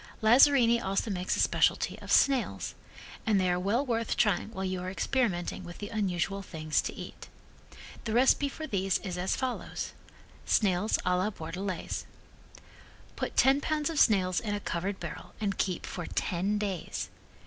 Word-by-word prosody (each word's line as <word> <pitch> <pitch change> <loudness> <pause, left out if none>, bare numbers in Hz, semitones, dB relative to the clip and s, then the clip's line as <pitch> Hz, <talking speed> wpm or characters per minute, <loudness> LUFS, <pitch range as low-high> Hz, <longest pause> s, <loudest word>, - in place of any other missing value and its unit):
Lazzarini 235 0 +6
also 195 +3 -1
makes 180 -1 -1
a - - -3
specialty - - +2
of - - -7
snails, 270 -3 +2 0.5
and 210 -3 +3
they 185 -1 +2
are 175 - +1
well 215 +9 +1
worth 230 -3 -1
trying 210 -3 +2
while 190 -4 -4
you 185 -1 -2
are 180 - -4
experimenting 190 -4 -1
with 175 0 -9
the 205 - -6
unusual 195 -2 -1
things 155 -4 -1
to - - -5
eat. - - -9 0.8
The 220 - -2
recipe 265 +3 +4
for 315 +3 -6
these 195 - 0
is 185 -3 -4
as 185 +2 0
follows: 260 -2 -3 0.5
Snails 200 0 +2
a 180 0 +3
la 185 +3 +1
Bordelaise 180 0 -5 1.1
Put - - -4
ten 270 +2 +5
pounds 305 0 0
of 315 - -1
snails 185 -5 +4
in 210 -2 -2
a - - -2
covered 190 +1 -3
barrel - - -8
and 200 -3 -2
keep 185 -3 -1
for 175 - -5
ten 190 +4 -1
days. 200 -4 -3
200 Hz, 165 wpm, -29 LUFS, 180-230 Hz, 1.1 s, Lazzarini